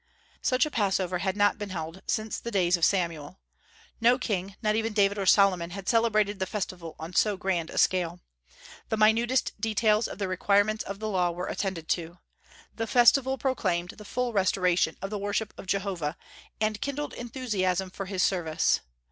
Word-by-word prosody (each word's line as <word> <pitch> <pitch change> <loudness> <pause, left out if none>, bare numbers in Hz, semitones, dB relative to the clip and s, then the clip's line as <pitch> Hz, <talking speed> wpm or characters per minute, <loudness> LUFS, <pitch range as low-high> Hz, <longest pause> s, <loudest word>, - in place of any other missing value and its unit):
Such 255 0 +2
a 305 - -5
Passover 190 -5 0
had 190 +2 -1
not 205 +1 +3
been 205 -1 -5
held 165 0 -6
since 215 0 -2
the 235 - -5
days 185 -5 +2
of 170 - -5
Samuel. 170 -4 0 0.6
No 240 +2 +5
king, 195 -6 -3
not 215 0 +2
even 225 0 -1
David 200 -1 +2
or 195 - -2
Solomon, 185 -4 +4
had 190 +1 -8
celebrated 215 -3 +2
the 190 - -1
festival 175 -5 -5
on 160 +3 -8
so 205 +3 +2
grand 185 -4 -1
a - - -8
scale. 175 -2 +2 0.7
The 220 - 0
minutest 230 +4 +3
details 215 0 +2
of - - -8
the 200 -1 -2
requirements 205 +3 +2
of 200 0 -5
the 215 - -3
Law 185 -4 +1
were 175 +1 -4
attended 185 -5 -3
to. 170 0 -2 0.6
The 225 0 -3
festival 260 +3 +4
proclaimed 185 -10 -1
the 210 - -13
full 245 +3 -2
restoration 180 -4 +2
of 195 - -4
the 210 - -3
worship 205 +1 -2
of - - -11
Jehovah, 185 -5 -2 0.4
and 215 0 -1
kindled 285 +1 -3
enthusiasm 200 -7 -2
for 195 0 -6
his 185 -1 0
service. 165 -5 +1
200 Hz, 180 wpm, -27 LUFS, 180-220 Hz, 0.7 s, No